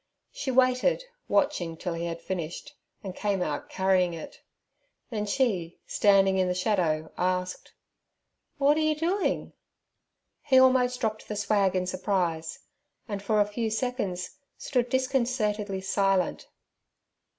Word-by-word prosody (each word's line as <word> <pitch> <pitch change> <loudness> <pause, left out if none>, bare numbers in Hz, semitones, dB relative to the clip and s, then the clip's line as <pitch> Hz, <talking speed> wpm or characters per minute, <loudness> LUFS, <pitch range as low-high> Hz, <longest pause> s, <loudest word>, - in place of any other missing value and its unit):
She 270 - -4
waited, 260 - +3 0.2
watching 175 -4 +1
till 175 +1 -3
he 170 +1 -3
had 165 0 -6
finished, 185 - -5 0.3
and 190 -2 -6
came 200 -3 0
out 150 -4 -4
carrying 185 -2 +2
it. 160 - -10 0.7
Then 210 -2 -2
she, 200 -8 0
standing 195 -2 +4
in 185 - +2
the 180 - 0
shadow, 175 -5 0
asked, 180 0 -2 0.8
'What 290 +1 +4
er - - +2
you 310 0 +2
doin'?' 350 +6 -1 0.9
He 270 -3 +3
almost 255 -1 +4
dropped 215 -2 -2
the 210 - -4
swag 200 -2 +1
in 185 - +2
his 180 0 -3
surprise, 180 -4 -1 0.5
and 205 -3 -4
for 210 +1 +1
a - - +4
few 220 +2 -2
seconds 220 -2 -3 0.2
stood 250 -3 -1
disconcertedly 235 -7 0
silent. 195 -1 0
200 Hz, 135 wpm, -27 LUFS, 180-250 Hz, 0.9 s, standing